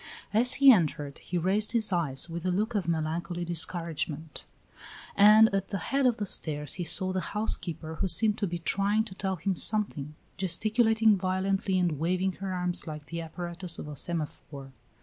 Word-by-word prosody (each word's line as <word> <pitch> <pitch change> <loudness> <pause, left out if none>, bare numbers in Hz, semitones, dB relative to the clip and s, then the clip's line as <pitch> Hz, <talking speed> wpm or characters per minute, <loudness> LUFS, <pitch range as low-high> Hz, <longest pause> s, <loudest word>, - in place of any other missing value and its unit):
As 240 +4 +5
he 275 -1 +7
entered, 150 - 0
he 180 - -4
raised 200 +6 +1
his 220 -4 +1
eyes 150 -5 0
with 170 0 -6
a 185 - -1
look 215 +6 -1
of 195 -6 -2
melancholy 170 +2 -3
discouragement, 165 -2 -3 0.7
and 210 +2 +7
at 195 -1 -1
the 200 - -4
head 275 +6 0
of 240 - +1
the 205 - -3
stairs 150 -6 0
he 180 - -4
saw 185 +3 0
the 185 - -1 0.2
housekeeper, 165 -6 -2
who - - +1
seemed 215 +3 +3
to 205 - -1
be 175 0 -4
trying 200 +5 +1
to 215 -4 -9
tell 190 0 -3
him 190 +3 -2
something, 165 -9 -1 0.2
gesticulating 220 +4 +2
violently 190 +1 -1
and 175 -5 0
waving 185 +4 0
her 195 -1 -3
arms 180 -1 -1
like 150 -1 -7
the 170 +2 -6
apparatus 170 +1 -5
of - - -8
a 150 - -7
semaphore. 145 -3 -4
180 Hz, 180 wpm, -28 LUFS, 165-205 Hz, 0.7 s, he